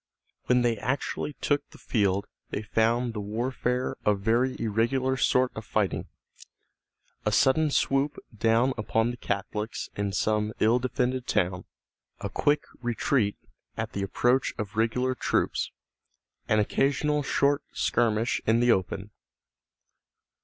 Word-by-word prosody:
When 125 -1 +4
they 120 -2 +2
actually 140 +3 -2
took 145 -1 0
the - - -15
field 100 -3 0 0.2
they 110 - -3
found 115 +2 +1
the 105 - -4
warfare 125 +4 -1
a 105 - +3
very 115 +6 +1
irregular 120 +4 +1
sort 130 0 +2
of 110 - -6
fighting, 105 -2 -1 1.2
a 105 - +1
sudden 140 +7 +4
swoop 135 +1 +1 0.2
down 115 +4 +3
upon 115 +2 +1
the 120 - -8
Catholics 105 +1 -3
in 100 -1 -1
some 105 +2 0
ill 115 +3 +4
defended 125 0 -1
town, 90 -3 0 0.5
a 100 - -4
quick 145 +8 +1 0.2
retreat 120 -2 0 0.4
at - - -3
the 100 - -2
approach 120 +6 +1
of 105 -2 -5
regular 120 +3 +1
troops, - - 0 0.8
an 110 - +3
occasional 145 +7 +1
short 140 +1 +2
skirmish 115 0 +1
in 110 +1 +4
the 120 0 +4
open. 95 +1 -1
115 Hz, 130 wpm, -27 LUFS, 105-130 Hz, 1.2 s, When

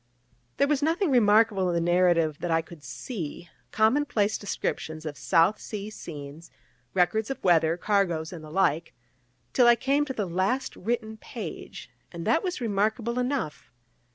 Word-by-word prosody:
There 280 - +3
was 295 -1 +1
nothing 325 +3 +1
remarkable 210 -5 +4
in 175 - 0
the 170 +1 +1
narrative 170 -4 +3
that 175 - -3
I 165 0 +2
could 160 -2 -14
see 170 - -6 0.2
common 225 - +3
place 210 -5 +1
descriptions 160 -5 -4
of 150 -2 -4
South 165 - +3
Sea 210 0 -6
scenes, 150 -3 -9 0.5
records 210 +4 +2
of 270 - -5
weather, 165 -2 +4
cargoes, 180 -4 0
and 165 -3 -8
the 155 - -10
like 165 -1 0 0.6
till 245 -2 +5
I 240 - +7
came 275 +4 +1
to 270 - -4
the 215 -5 -2
last 190 +9 -1
written 220 +1 -3
page: - - -8 0.2
and 170 -1 -7
that 325 - +3
was 365 -2 -3
remarkable 225 +2 0
enough. 250 - -2
200 Hz, 160 wpm, -27 LUFS, 165-235 Hz, 0.6 s, I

